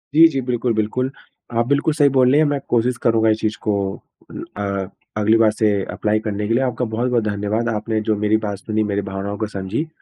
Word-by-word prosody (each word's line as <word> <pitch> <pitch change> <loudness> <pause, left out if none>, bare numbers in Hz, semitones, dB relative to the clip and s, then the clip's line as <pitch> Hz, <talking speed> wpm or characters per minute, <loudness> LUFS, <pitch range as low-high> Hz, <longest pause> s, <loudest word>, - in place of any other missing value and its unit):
जी, 165 +1 +9
जी, 140 -4 -2
बिल्कुल, 125 -1 -1
बिल्कुल। 110 +5 -1 0.5
आप 115 0 +2
बिल्कुल 145 +3 +2
सही 145 -2 +4
बोल 130 -1 +5
रही 145 - +5
हैं। 155 - +4
मैं 145 -1 0
कोशिश 120 +1 +1
करूँगा 115 -1 +3
इस 110 0 +2
चीज़ 110 0 -1
को 105 - 0 0.6
उम, - - -7
अ, 100 -2 -2 0.3
अगली 110 +2 +4
बार 110 -1 +4
से 110 0 +1 0.2
अप्लाई 110 0 0
करने 105 -1 -2
के 115 - +1
लिए। 125 +3 +2
आपका 125 -1 -1
बहुत-बहुत 120 +1 0
धन्यवाद, 105 +2 -1
आपने 110 0 -1
जो - - +3
मेरी 110 +1 +3
बात 100 -1 -3
सुनी, 110 +2 -1
मेरी 100 -1 -1
भावनाओं 100 +1 -4
को 110 - -2
समझी। 95 - -2
110 Hz, 220 wpm, -20 LUFS, 105-125 Hz, 0.6 s, जी